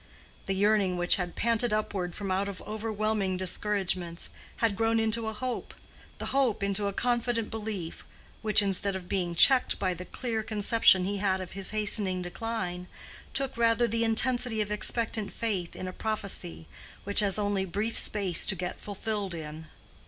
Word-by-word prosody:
The 195 Hz, -, 0 dB
yearning, 200 Hz, -2 st, +2 dB
which 175 Hz, 0 st, +4 dB
had 180 Hz, -2 st, -4 dB
panted 230 Hz, +1 st, +1 dB
upward 195 Hz, -4 st, -2 dB
from 195 Hz, -2 st, -4 dB
out 195 Hz, +2 st, 0 dB
of 195 Hz, -, -7 dB
over 220 Hz, +1 st, -4 dB
whelming 210 Hz, -3 st, 0 dB
discouragements, 185 Hz, -2 st, -1 dB, 0.3 s
had 225 Hz, -3 st, +1 dB
grown 225 Hz, +1 st, +2 dB
into 225 Hz, 0 st, +1 dB
a 220 Hz, -, -2 dB
hope—the 245 Hz, +3 st, -7 dB
hope 260 Hz, -7 st, +1 dB
into 200 Hz, +1 st, +1 dB
a -, -, -1 dB
confident 240 Hz, 0 st, -1 dB
belief, 210 Hz, -6 st, -5 dB, 0.4 s
which, 215 Hz, -1 st, +6 dB
instead 195 Hz, 0 st, +1 dB
of 185 Hz, -2 st, -6 dB
being 180 Hz, -3 st, -1 dB
checked 260 Hz, +8 st, +5 dB
by 185 Hz, -2 st, 0 dB
the 180 Hz, +1 st, -8 dB
clear 225 Hz, +3 st, -3 dB
conception 210 Hz, -3 st, +4 dB
he 200 Hz, +1 st, -1 dB
had 190 Hz, -1 st, +1 dB
of 185 Hz, -2 st, -7 dB
his 195 Hz, 0 st, -4 dB
hastening 210 Hz, -4 st, -1 dB
decline, 180 Hz, -2 st, -4 dB, 0.5 s
took 270 Hz, 0 st, -1 dB
rather 230 Hz, 0 st, +3 dB
the 230 Hz, 0 st, +1 dB
intensity 235 Hz, 0 st, +1 dB
of 210 Hz, -1 st, -1 dB
expectant 220 Hz, 0 st, -1 dB
faith 195 Hz, -7 st, -3 dB
in 185 Hz, -, -5 dB
a 185 Hz, -, -5 dB
prophecy 195 Hz, -, -4 dB, 0.4 s
which 200 Hz, 0 st, +6 dB
has 200 Hz, -2 st, +4 dB
only 205 Hz, -2 st, 0 dB
brief 205 Hz, +5 st, -2 dB
space 195 Hz, -4 st, +1 dB
to -, -, +2 dB
get 180 Hz, 0 st, -5 dB
fulfilled 205 Hz, -2 st, -3 dB
in. 155 Hz, 0 st, -8 dB
205 Hz, 165 wpm, -29 LUFS, 185-225 Hz, 0.5 s, which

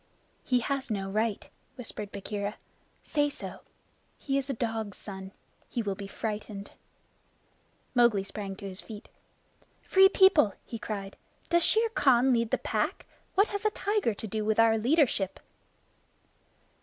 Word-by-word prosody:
"He 250 Hz, -1 st, +2 dB
has 275 Hz, +1 st, -2 dB
no 195 Hz, -3 st, -2 dB
right," 215 Hz, 0 st, -1 dB, 0.3 s
whispered 215 Hz, -5 st, -6 dB
Bagheera. 205 Hz, +1 st, -4 dB, 0.5 s
"Say 290 Hz, -1 st, +1 dB
so. -, -, -8 dB, 0.6 s
He 275 Hz, -, -2 dB
is 275 Hz, 0 st, 0 dB
a -, -, 0 dB
dog's 225 Hz, -3 st, -3 dB
son. 190 Hz, -1 st, -8 dB, 0.4 s
He 235 Hz, -, -2 dB
will 200 Hz, -2 st, -1 dB
be 200 Hz, +1 st, -7 dB
frightened." 210 Hz, -1 st, -5 dB, 1.2 s
Mowgli 235 Hz, -6 st, +4 dB
sprang 195 Hz, 0 st, -5 dB
to 200 Hz, 0 st, -7 dB
his 185 Hz, 0 st, -1 dB
feet. 210 Hz, -2 st, -10 dB, 0.7 s
"Free 385 Hz, 0 st, +6 dB
People," 320 Hz, -, +5 dB
he 230 Hz, -, -6 dB
cried, 200 Hz, -3 st, -5 dB, 0.3 s
"does 345 Hz, 0 st, +4 dB
Shere 450 Hz, +1 st, +4 dB
Khan 265 Hz, -, +4 dB
lead 230 Hz, -1 st, +1 dB
the -, -, +2 dB
Pack? -, -, -2 dB, 0.3 s
What 400 Hz, +3 st, +4 dB
has 405 Hz, -1 st, -3 dB
a 430 Hz, -, +4 dB
tiger 410 Hz, -, 0 dB
to 220 Hz, -, -6 dB
do 215 Hz, +1 st, -2 dB
with 220 Hz, +1 st, +1 dB
our 225 Hz, 0 st, +6 dB
leadership?" 235 Hz, -, +2 dB
225 Hz, 145 wpm, -29 LUFS, 205-275 Hz, 1.2 s, Free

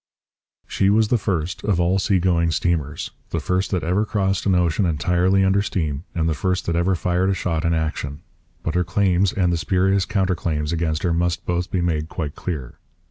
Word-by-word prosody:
] -, -, -72 dB, 0.2 s
She 95 Hz, -, +1 dB
was 105 Hz, +1 st, +3 dB
the 120 Hz, -, +3 dB
first 90 Hz, -3 st, -2 dB
of 100 Hz, -5 st, +1 dB
all 90 Hz, +2 st, +2 dB
sea 95 Hz, 0 st, +2 dB
going 85 Hz, -2 st, +2 dB
steamers, 75 Hz, -1 st, -1 dB, 0.2 s
the 85 Hz, -, -2 dB
first 90 Hz, +5 st, -1 dB
that 90 Hz, -4 st, -1 dB
ever 90 Hz, +6 st, +1 dB
crossed 100 Hz, -2 st, -1 dB
an 95 Hz, -, +3 dB
ocean 90 Hz, +2 st, +2 dB
entirely 90 Hz, +4 st, +2 dB
under 95 Hz, +1 st, +3 dB
steam, 80 Hz, -6 st, -2 dB
and 80 Hz, -1 st, +1 dB
the 80 Hz, -, +1 dB
first 90 Hz, +3 st, -1 dB
that 85 Hz, -, -1 dB
ever 90 Hz, +3 st, +2 dB
fired 90 Hz, +2 st, 0 dB
a 95 Hz, -, +1 dB
shot 85 Hz, -2 st, -1 dB
in 85 Hz, 0 st, +2 dB
action. 80 Hz, -1 st, -3 dB, 0.4 s
But 80 Hz, -, -2 dB
her 90 Hz, 0 st, +2 dB
claims 95 Hz, +1 st, +2 dB
and 90 Hz, -3 st, +1 dB
the -, -, +1 dB
spurious 95 Hz, +3 st, +1 dB
counter 95 Hz, -2 st, +1 dB
claims 80 Hz, -2 st, -2 dB
against 80 Hz, -1 st, -1 dB
her 85 Hz, -2 st, +1 dB
must 85 Hz, +1 st, -1 dB
both 90 Hz, 0 st, -1 dB
be 90 Hz, -, -1 dB
made 80 Hz, -2 st, -1 dB
quite 75 Hz, -6 st, -4 dB
clear. 70 Hz, -9 st, -6 dB
90 Hz, 210 wpm, -22 LUFS, 80-95 Hz, 0.4 s, was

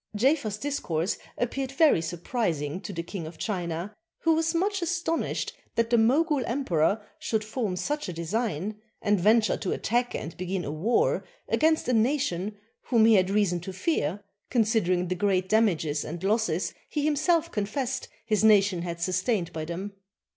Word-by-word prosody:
Jafer's 230 Hz, -2 st, +2 dB
discourse 200 Hz, -, -2 dB, 0.2 s
appeared 260 Hz, +2 st, -2 dB
very 295 Hz, -, +5 dB
surprising 170 Hz, -, -2 dB
to 205 Hz, -, -6 dB
the 170 Hz, -3 st, -4 dB
King 170 Hz, -2 st, -6 dB
of 160 Hz, 0 st, -10 dB
China, 175 Hz, 0 st, -3 dB, 0.3 s
who 330 Hz, -, +4 dB
was 325 Hz, +1 st, +1 dB
much 390 Hz, +3 st, +1 dB
astonished 340 Hz, -1 st, -1 dB, 0.2 s
that 230 Hz, 0 st, +1 dB
the 235 Hz, -, +5 dB
Mogul 280 Hz, +5 st, +3 dB
Emperor 210 Hz, -, +1 dB
should 220 Hz, -1 st, -1 dB
form 215 Hz, -3 st, -2 dB
such 295 Hz, +6 st, -2 dB
a -, -, -4 dB
design, 205 Hz, +3 st, -2 dB, 0.2 s
and 205 Hz, -1 st, +3 dB
venture 215 Hz, +4 st, +4 dB
to 195 Hz, -, -3 dB
attack 240 Hz, +2 st, 0 dB
and 160 Hz, -, -5 dB
begin 185 Hz, 0 st, -3 dB
a 145 Hz, -, -3 dB
war 190 Hz, +11 st, +1 dB, 0.2 s
against 315 Hz, 0 st, +2 dB
a 250 Hz, -, +2 dB
nation 220 Hz, -, +1 dB, 0.3 s
whom 230 Hz, -3 st, +4 dB
he 225 Hz, -, +6 dB
had 185 Hz, -2 st, +4 dB
reason 195 Hz, -4 st, +2 dB
to 180 Hz, +3 st, -7 dB
fear, 195 Hz, -, -1 dB, 0.3 s
considering 210 Hz, -6 st, +2 dB
the 185 Hz, -, 0 dB
great 185 Hz, 0 st, +1 dB
damages 170 Hz, -9 st, +2 dB
and 170 Hz, +3 st, -6 dB
losses 195 Hz, -4 st, +1 dB, 0.2 s
he 295 Hz, -1 st, -1 dB
himself 310 Hz, +3 st, +2 dB
confessed 250 Hz, +5 st, -2 dB, 0.2 s
his 215 Hz, -1 st, +1 dB
nation 200 Hz, -4 st, +5 dB
had 170 Hz, -1 st, -4 dB
sustained 185 Hz, +1 st, 0 dB
by 155 Hz, -1 st, -4 dB
them. 185 Hz, +5 st, -5 dB
210 Hz, 160 wpm, -27 LUFS, 175-250 Hz, 0.3 s, he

